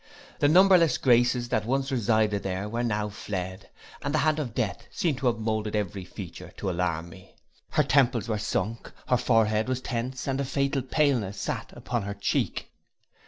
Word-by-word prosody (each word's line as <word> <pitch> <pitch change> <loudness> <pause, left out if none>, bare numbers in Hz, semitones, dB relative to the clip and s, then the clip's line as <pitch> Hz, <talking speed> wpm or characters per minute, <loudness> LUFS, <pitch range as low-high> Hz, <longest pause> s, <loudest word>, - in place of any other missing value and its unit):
The 145 - +4
numberless 180 0 +6
graces 120 -1 +3
that 110 -4 +1
once 135 +2 0
resided 110 -4 +2
there 95 +1 -3
were 115 +3 -2
now 105 -3 -1
fled, 95 -2 -5 0.3
and 140 - -2
the 150 -1 +2
hand 155 0 +2
of 135 -6 -4
death 110 -5 -2
seemed 155 -7 -1
to 135 - 0
have 120 -2 +2
molded 110 -1 -2
every 100 -2 -2
feature 95 -1 -9
to 95 - -2
alarm 85 -1 -1
me. 90 +2 -15 0.3
Her - - +3
temples 125 -4 +3
were 110 -2 -1
sunk, 110 +2 -2 0.2
her 125 - +4
forehead 110 -2 +2
was 130 -1 0
tense, 130 +1 -4
and 135 0 0
a - - 0
fatal 140 +1 0
paleness 125 -7 +1
sate - - -3
upon 120 -2 -3
her 100 0 -5
cheek. 100 - -1
115 Hz, 180 wpm, -27 LUFS, 105-130 Hz, 0.3 s, numberless